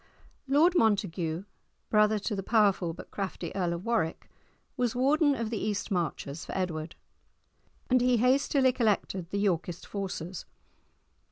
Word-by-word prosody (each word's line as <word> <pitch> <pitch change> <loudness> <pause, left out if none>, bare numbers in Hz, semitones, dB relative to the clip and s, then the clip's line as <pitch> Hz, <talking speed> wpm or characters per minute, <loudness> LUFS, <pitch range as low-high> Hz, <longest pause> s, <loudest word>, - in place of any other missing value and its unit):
Lord 300 +6 +4
Montague, 180 - +1 0.5
brother 215 0 +4
to 210 +1 -3
the 195 - -2
powerful 195 -5 +2
but 165 - -11
crafty 190 -3 -4
Earl 180 -3 0
of 170 +4 -6
Warwick, 225 -9 -1 0.4
was 245 -3 0
warden 285 +3 +3
of 230 -3 -3
the 220 - -2
East 210 0 -2
Marches 165 -4 -2
for - - -5
Edward, 165 -3 -3 0.9
and 255 -1 +3
he 250 0 +3
hastily 260 +2 +3
collected 205 -7 0
the 200 - -2
Yorkist 180 -3 -1
forces. 185 -3 -5
205 Hz, 140 wpm, -29 LUFS, 175-245 Hz, 0.9 s, Lord